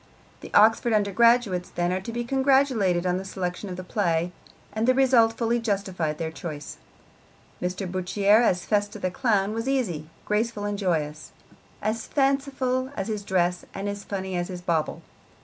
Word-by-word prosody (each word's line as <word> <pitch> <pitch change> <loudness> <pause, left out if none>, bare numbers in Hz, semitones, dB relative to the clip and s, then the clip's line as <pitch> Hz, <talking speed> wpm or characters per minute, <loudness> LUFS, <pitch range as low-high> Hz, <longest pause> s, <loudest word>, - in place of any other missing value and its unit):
The - - -10
Oxford 225 +2 +5
undergraduates, 210 -2 +3
then, 175 +1 -1
are 185 - -1
to 210 - -6
be 240 +1 -2
congratulated 265 -8 +2
on 180 0 +1
the 190 - -4
selection 190 +1 -4
of 180 - -5
the 185 - -6
play, 175 -3 0 0.4
and 220 +2 0
the 255 - +5
result 250 -4 +4
fully 230 +1 0
justified 190 -8 -2
their 160 -1 -3
choice. 155 -3 -7 0.8
Mr. 180 +2 -2
Bourchier 195 +4 +2
as 180 -6 +1
Festa 205 0 0
the 185 -3 -2
clown 210 -2 +1
was 230 +3 -2
easy, 180 - -1 0.2
graceful 210 0 -1
and 205 -1 -2
joyous, 155 -6 -2 0.5
as 220 +2 -2
fanciful 270 -2 0
as 195 +3 -2
his 210 -2 -2
dress 180 -2 0
and 195 +1 -3
as 200 0 -4
funny 190 -2 -4
as 175 0 -1
his 180 -2 -7
bauble. 165 -3 -1
200 Hz, 165 wpm, -25 LUFS, 180-230 Hz, 0.8 s, Oxford